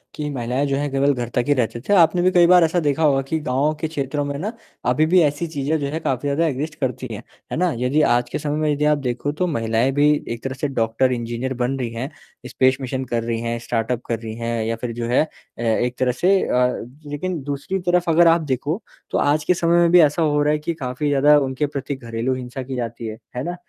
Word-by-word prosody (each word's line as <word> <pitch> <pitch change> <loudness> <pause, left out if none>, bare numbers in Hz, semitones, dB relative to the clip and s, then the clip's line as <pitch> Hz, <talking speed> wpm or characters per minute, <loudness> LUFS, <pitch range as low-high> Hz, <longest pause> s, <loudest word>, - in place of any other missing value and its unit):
कि 150 -1 -3
महिलाएँ 130 +1 -1
जो 140 - 0
हैं 145 +1 -1
केवल 140 +1 +2
घर 120 -3 -4
तक 125 - +2
ही 145 - +4
रहते 120 -3 -1
थे। 205 - +3
आपने 175 -2 +5
भी 185 +1 +3
कई 175 -2 +5
बार 180 -1 +7
ऐसा 165 +2 +2
देखा 150 0 0
होगा 140 -3 +4
कि 145 +4 -2
गाँव 145 +2 0
के 160 - 0
क्षेत्रों 145 -1 -2
में 140 0 -3
ना 210 +7 -3 0.4
अभी 140 +6 +3
भी 180 +2 +4
ऐसी 150 +2 0
चीज़ें 150 0 -1
जो 140 - -2
है 155 +3 -3
काफ़ी 135 -2 -2
ज़्यादा 145 +4 +1
एग्ज़िस्ट 150 +3 -3
करती 130 -1 -2
हैं। 105 - -7 0.3
है - - -2
ना? 180 0 +2
यदि 130 +5 +1
आज 120 -3 +2
के - - -3
समय 150 0 -2
में 155 -1 +1
यदि 145 +1 0
आप 150 -1 +3
देखो 130 +1 -2
तो 180 +5 -1
महिलाएँ 115 -3 +1
भी 145 +2 +4 0.2
एक 115 - -9
तरह 135 - -3
से 140 +3 -2
डॉक्टर, 120 0 +1
इंजीनियर 120 +2 -3
बन 125 +2 -1
रही 120 -2 -2
हैं, 120 +4 -4 0.4
स्पेस 130 +1 +2
मिशन 130 0 -3
कर 120 -2 -2
रही 115 -1 -2
हैं, 115 0 -2
स्टार्टअप 120 +1 -2
कर 115 -2 -1
रही 110 -1 -7
हैं 115 -1 -2
या 115 - -1
फिर 125 - -3
जो 115 0 -4
है 120 - +3
अ, 155 - -13
एक 120 +2 0
तरह 130 -1 +2
से 185 +10 +2
अ - - -1
अ, 125 0 +1 0.3
लेकिन 160 +3 -3
दूसरी 145 +7 -3
तरफ़ 175 -1 +2
अगर 170 +1 +5
आप 165 0 +5
देखो 145 - -2 0.3
तो - - +1
आज 145 +1 +2
के 180 - +3
समय 170 0 +2
में 170 -1 +4
भी 180 - +7
ऐसा 150 +2 +3
हो 150 -2 +2
रहा 150 +1 +2
है 150 - 0
कि 160 +3 -3
काफ़ी 135 -2 -3
ज़्यादा 145 +1 +5
उनके 135 +1 -1
प्रति 140 -1 -4
घरेलू 115 0 -3
हिंसा 130 +1 -6
की 130 +1 -6
जाती 115 -1 -4
है। 110 0 -6 0.2
है 125 - -2
ना? 175 +4 -3
140 Hz, 260 wpm, -21 LUFS, 125-155 Hz, 0.4 s, बार